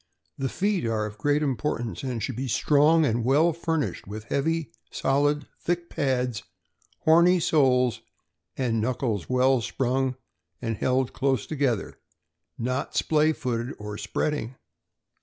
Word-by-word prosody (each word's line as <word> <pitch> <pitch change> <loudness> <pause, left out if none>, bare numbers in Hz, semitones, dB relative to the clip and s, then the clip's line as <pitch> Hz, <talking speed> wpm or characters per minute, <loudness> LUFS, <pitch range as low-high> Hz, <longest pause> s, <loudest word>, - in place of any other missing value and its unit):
The 135 -1 -2
feet 200 +1 0
are 110 -1 0
of 105 0 -8
great 145 +4 +2
importance, 130 -4 -2
and 125 -5 -3
should 130 - -3
be 130 +3 -3
strong 150 +6 +4
and 115 -3 0
well 150 +7 +3
fur 165 0 -1
nished 145 - -3
with 105 +2 -6
heavy, 160 +6 -1 0.2
solid, 145 +1 +1
thick 175 0 -2
pads, 125 -4 0 0.6
horny 170 +3 +5
soles, 125 - +2 0.6
and 115 -4 0
knuckles 115 -4 -1
well 130 0 +3
sprung 130 +3 -1 0.4
and 115 -2 -2
held 130 +2 0
close 135 -5 0
together, 135 -8 -1 0.6
not 130 +3 -2
splay, 155 0 +3
footed 125 -4 -3
or 105 0 -6
spreading. 145 -5 -2
130 Hz, 135 wpm, -26 LUFS, 120-150 Hz, 0.6 s, horny